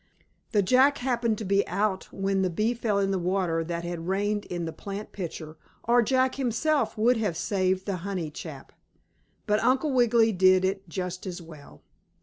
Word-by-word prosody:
The 205 -2 +3
Jack 260 +7 +4
happened 235 -3 0
to 215 - -5
be 200 +1 +2
out 195 +1 -1
when 195 0 0
the 185 - +1
bee 215 +7 0
fell 225 -4 -1
in 195 -1 +1
the 190 - 0
water 175 -2 0
that 170 +1 -4
had 170 -1 -5
rained 205 +2 0
in 175 -1 -4
the 160 - -5
plant 200 +1 -7
pitcher, 160 -4 -7 0.3
or 240 +1 +4
Jack 260 +3 +1
himself 270 +3 0
would 235 +3 +3
have 205 -7 -1
saved 185 -1 0
the 200 -3 -2
honey 180 -3 -4
chap. - - -9 0.7
But 210 -1 +1
Uncle 265 +3 +2
Wiggily 235 -2 +4
did 185 -1 +4
it 190 -1 -3
just 180 +2 -4
as 180 -1 -5
well. 160 -4 -14
195 Hz, 180 wpm, -27 LUFS, 180-225 Hz, 0.7 s, Jack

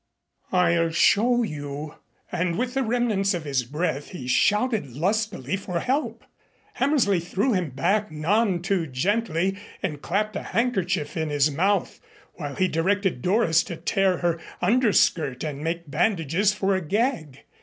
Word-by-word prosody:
"I'll 170 -2 +3
show 235 +8 +3
you." 145 -4 -5 0.4
And 170 -1 -1
with 250 +2 -1
the 270 - 0
remnants 220 -5 +1
of 170 - -4
his 135 -4 0
breath 145 +2 -3
he 130 -9 -8
shouted 210 - +1
lustily 190 - -1
for 180 -3 -3
help. 275 - -2 0.5
Hammersley 265 - +2
threw 195 +8 0
him 180 -5 0
back, 195 +11 0
none 175 +4 +1
too 185 -3 0
gently, 190 - 0 0.2
and 150 -6 -3
clapped 210 +4 -1
a - - -2
handkerchief 185 -10 -1
in 160 -1 -1
his 145 0 +2
mouth, 190 +6 0 0.3
while 145 -4 -6
he 185 - +2
directed 190 -2 0
Doris 180 - +3
to 170 - -5
tear 185 +3 +1
her 170 -1 0 0.2
under 225 +4 +3
skirt 140 -9 +2
and 150 -2 -4
make 165 -2 -3
bandages 180 +2 +1
for 200 -1 0
a 190 - -1
gag. 195 - -1
180 Hz, 150 wpm, -25 LUFS, 155-210 Hz, 0.5 s, I'll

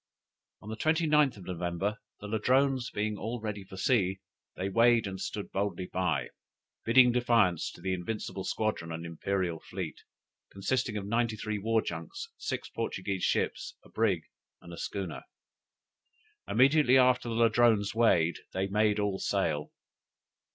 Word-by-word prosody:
"On 105 - -9
the 110 - -4
29th 150 -3 +2
of 95 - -11
November, 90 +3 -2 0.2
the 105 - -6
Ladrones 130 +4 +2
being 105 0 -2
all 115 +3 -3
ready 105 -2 -4
for 95 0 -11
sea, 95 -4 +1 0.4
they 95 - -2
weighed 115 +3 +4
and 95 -1 -5
stood 105 - -5
boldly 95 -2 -2
out, 85 -9 0 0.5
bidding 125 +2 +6
defiance 115 -8 +2
to - - -14
the 95 +1 -1
invincible 95 +1 -4
squadron 105 -6 -2
and 80 +1 -5
imperial 85 0 -2
fleet, - - -6 0.5
consisting 105 +3 -1
of 100 - -4
ninety 115 +1 0
three 110 0 -3
war 110 +2 +1
junks, 460 +4 -6
six - - -4
Portuguese - - -3
ships, - - -1
a - - -18
brig, - - +1 0.4
and - - -12
a - - -8
schooner. - - -4 1.3
Immediately 135 +1 +5
after 125 -2 +4
the 115 - -2
Ladrones 115 -2 +3
weighed, 90 -8 +3
they 95 +1 0
made 105 +1 +2
all 100 -2 0
sail. 75 0 -1
105 Hz, 145 wpm, -30 LUFS, 95-120 Hz, 1.3 s, bidding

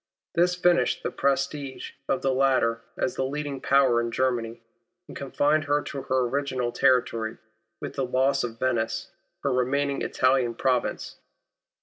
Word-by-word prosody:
This 180 +1 +3
finished 175 -1 +2
the - - -2
prestige 140 0 -2 0.2
of 135 - 0
the 135 -1 +2
latter 130 -4 +2 0.2
as 125 - 0
the 130 - -2
leading 140 0 -3
power 130 -4 +4
in 115 - -2
Germany, 120 -2 -1 0.5
and - - -10
confined 145 +2 +1
her 145 0 +1
to 140 - -5
her 130 0 0
original 130 -2 -1
territory, 115 -3 +1 0.4
with - - -6
the 135 - +1
loss 135 +2 +1
of 115 -2 -5
Venice, 120 -3 -1 0.3
her 140 - +1
remaining 140 +3 0
Italian 130 -2 +1
province. 125 0 -1
130 Hz, 145 wpm, -26 LUFS, 125-140 Hz, 0.5 s, power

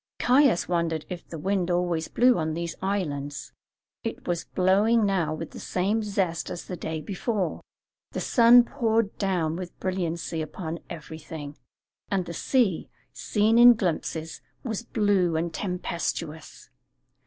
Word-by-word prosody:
Caius 250 -8 +4
wondered 170 -3 -1
if 180 -2 -7
the 165 - -7
wind 185 +2 0
always 175 -2 0
blew 245 -4 +4
on 155 -1 -1
these 170 0 -3
islands; 145 -8 -3 0.5
it - - -5
was 175 -1 -1
blowing 205 +5 +3
now 185 -6 +1
with 155 +1 -5
the - - -9
same 200 +5 0
zest 195 -5 -1
as 175 - -6
the 180 - -5
day 160 -1 -4
before; 195 0 -2 0.5
the - - -3
sun 240 0 +6
poured 230 -5 0
down 175 -5 0
with 180 0 -7
brilliancy 170 -3 -2
upon 160 +2 -5
everything, 155 -2 -8 0.5
and 190 -3 0
the 170 - -6
sea, 215 - +1 0.2
seen 220 +2 +2
in 240 0 +9
glimpses, 165 -4 -3 0.2
was 220 -4 -3
blue 205 -7 +1
and 165 +1 -1
tempestuous. 170 -4 -4
180 Hz, 140 wpm, -26 LUFS, 165-205 Hz, 0.5 s, in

